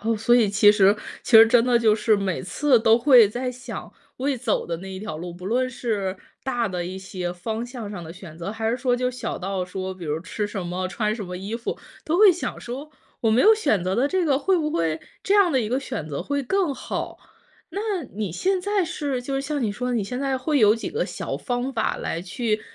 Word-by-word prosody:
哦， 225 +1 0
所 230 +3 +3
以 230 -4 +4
其 205 +1 +6
实 205 0 +4 0.3
其 - - -7
实 225 - +10
真 235 0 +4
的 245 -1 +3
就 220 -2 +4
是 215 0 +2
每 195 -3 -2
次 245 - +2
都 225 +1 +5
会 240 -4 +7
在 250 +4 -3
想， 250 +1 -8 0.2
未 270 +1 -1
走 235 -2 -1
的 170 - -2
那 190 +1 -8
一 190 - -6
条 190 -6 -5
路， 175 +2 -6
不 180 +2 -9
论 255 +4 +1
是 205 -6 -2 0.3
大 245 -3 -1
的 180 -3 -3
一 185 +2 -5
些 185 -2 -5
方 220 +6 -4
向 240 -3 -7
上 185 -4 -6
的 160 0 -8
选 175 -4 -11
择， 170 +3 -5
还 220 +1 -2
是 240 - 0
说 245 -1 +1
就 250 0 0
小 255 - -5
到 190 0 -2
说， 185 +1 -5
比 180 -2 -9
如 150 0 -1
吃 205 +4 -3
什 195 -4 -5
么， 185 +1 -3
穿 215 +2 -1
什 215 -3 -5
么 180 0 -6
衣 195 +4 -5
服， 230 0 -4 0.3
都 330 +4 0
会 415 -3 +8
想 350 - -5
说， 270 +6 -7 0.3
我 225 - +2
没 230 +4 +4
有 440 - +7
选 220 - +1
择 185 - 0
的 255 +7 +2
这 370 +2 +1
个， 275 -4 +2
会 380 +5 +2
不 305 -2 -1
会 165 - -1 0.2
这 400 - +2
样 385 -6 +5
的 260 - +3
一 215 - -2
个 255 - +1
选 160 - -5
择 140 -2 -4
会 285 0 -2
更 335 +1 0
好？ - - -5 0.5
那 400 - -4 0.3
你 205 -2 -3
现 375 - 0
在 400 0 +1
是， 290 -7 -3
就 270 +2 -4
是 270 - 0
像 285 -1 -2
你 215 - 0
说 250 +5 -3
的， 250 - 0
你 225 - +1
现 250 +5 -4
在 270 -1 0
会 285 +3 0
有 215 -2 +6
几 230 - -5
个 450 +4 -1
小 - - -4
方 250 +1 -3
法， - - 0
来 165 - -3
去 215 +4 -2
225 Hz, 270 characters per minute, -24 LUFS, 190-265 Hz, 0.5 s, 实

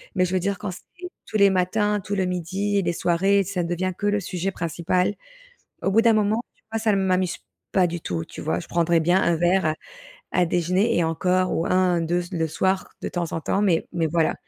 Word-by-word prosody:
mais 185 - +3
je 180 - -4
veux 185 - +2
dire 195 +1 -1
quand 205 -1 -5
c'est 355 - -11 0.2
tous 215 - -1
les 200 -1 +6
matins, 205 +3 +1
tout 205 - -3
le 190 - +1
midi, 185 +3 -1
et 195 - +2
des 170 - 0
soirées, 195 +4 +2
ça 185 -2 -2
devient 175 +2 -1
que 205 - -1
le 205 0 +2
sujet 185 0 -3
principal, 175 +3 -1 0.7
au 195 - +1
bout 220 - +5
d'un 230 -1 +5
moment, 215 +2 +2 0.2
tu - - -35
vois, 225 - -1
ça 215 -1 +2
ne - - +2
m'amuse 185 -2 +1 0.4
pas 185 -2 +4
du 175 0 -4
tout, 85 - -3
tu - - -10
vois? 85 - -1
Je - - -7
prendrai 170 0 +2
bien 175 +4 +3
un 170 -1 +2
verre 175 +2 +2
à 155 - +1 0.6
à 180 -1 +3
déjeuner 180 +6 +1
et 170 - +2
encore 185 +3 +1
ou 165 - 0
1-2 175 -2 +2
c 175 - -11
le 160 -1 0
soir, 190 +4 0
de - - -2
temps 175 -2 -3
en 165 - -2
temps, 195 - 0
mais 180 -6 +2
mais 165 -2 0
voilà 160 0 +1
180 Hz, 235 wpm, -24 LUFS, 170-195 Hz, 0.7 s, les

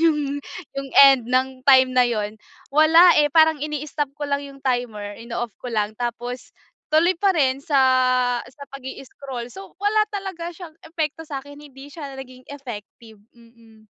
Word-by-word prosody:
yung 310 -3 +3 0.5
yung 275 0 -5 0.2
end 260 -4 +5
ng 260 0 0
time 260 -1 +6
na 255 - +4
yun 215 -1 -3 0.3
wala 325 +4 +7
eh, 295 - +3
parang 315 0 +4
ini-stop 300 -1 -3
ko 295 - -4
lang 280 0 -1
yung 275 -1 -11
timer, 225 -5 -2
ino-off 235 -1 -5
ko 250 - -6
lang 215 -2 -1
tapos, 240 +1 -4 0.4
tuloy 330 +4 +4
pa 400 -1 +4
rin 270 -2 +1
sa 285 -2 +1 0.7
sa 280 +3 -15
pag 275 - -8
i-scroll 265 -2 -8
so, 195 - -12
wala 415 +2 +2
talaga 380 -4 -5
siyang 350 -4 -10
epekto 320 -1 -4
sa'kin, 285 +1 -8
hindi 275 -1 -13
siya 280 -4 -8
naging 255 -1 -11
effective, 230 -5 -10 0.2
mm. 230 -2 -21
270 Hz, 160 wpm, -22 LUFS, 240-300 Hz, 0.7 s, wala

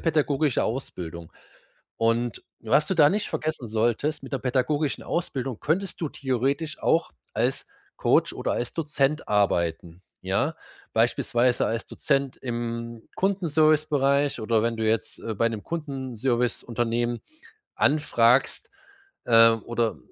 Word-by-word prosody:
pädagogische 150 -3 +1
Ausbildung 85 -9 -5 0.6
und 115 +1 0 0.2
was 115 +7 +2
du 190 - +1
da 150 -3 +6
nicht 210 +1 -1
vergessen 155 -6 -3
solltest: 120 +7 0
Mit - - -10
'ner 135 - 0
pädagogischen 135 +4 0
Ausbildung 135 -8 -3
könntest 180 +5 -1
du 160 - -1
theoretisch 140 +5 -2
auch 165 - +2 0.2
als - - 0 0.3
Coach - - +2
oder - - -2
als 120 - -3
Dozent 150 -2 -1
arbeiten, 85 -4 0 0.2
ja, - - 0 0.4
beispielsweise 120 +1 +2
als 115 0 -2
Dozent 140 -2 -1
im 115 -1 -5
Kundenservicebereich 155 -7 +2
oder 110 0 +1
wenn 115 0 0
du 110 - -2
jetzt, 110 0 -1
äh, 110 - -4
bei 115 +3 +2
'nem 110 -2 -5
Kundenserviceunternehmen 120 -5 -2 0.6
anfragst, 135 -4 +2 0.6
äh, 115 -1 +7
oder, 115 0 -2
125 Hz, 120 wpm, -25 LUFS, 115-150 Hz, 0.6 s, äh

